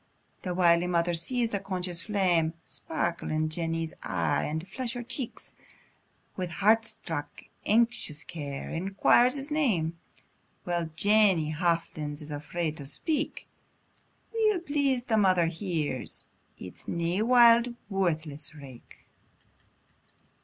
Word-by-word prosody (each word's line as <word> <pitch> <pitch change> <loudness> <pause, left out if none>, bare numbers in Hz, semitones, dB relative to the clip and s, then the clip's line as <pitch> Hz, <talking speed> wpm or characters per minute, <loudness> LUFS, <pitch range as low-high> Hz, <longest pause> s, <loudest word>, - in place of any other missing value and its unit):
The 180 -2 -3
wily 175 -1 +4
mother 175 0 +1
sees 230 +8 +1
the 200 - -1
conscious 185 -3 -2
flame 175 -6 +1
Sparkle 170 +1 -3
in 155 0 0
Jenny's 165 0 -2
e'e, 85 - 0
and 160 +4 -4
flush 240 +4 -3
her 245 -1 -5
cheek; 240 +1 -4 1.0
With 180 -2 -3
heart 215 +6 +3
struck 165 -10 -7 0.2
anxious 225 -9 +2
care, 140 -4 -6
enquires 195 - +3
his 280 +2 -4
name, 180 - +1 0.6
While 175 -2 -2
Jenny 200 -5 +4
hafflins 155 -3 -1
is 150 - -9
afraid 155 +2 -3
to 140 - -7
speak; 310 - -2 0.9
Weel 430 -4 +2
pleased 280 -6 0
the 220 - +2
mother 185 -4 +4
hears, 165 - -2 0.3
it's 90 - -10
nae 170 +3 -1
wild, 235 0 +6
worthless 160 -7 -2
rake. 135 -5 -13
175 Hz, 115 wpm, -28 LUFS, 160-225 Hz, 1.0 s, wild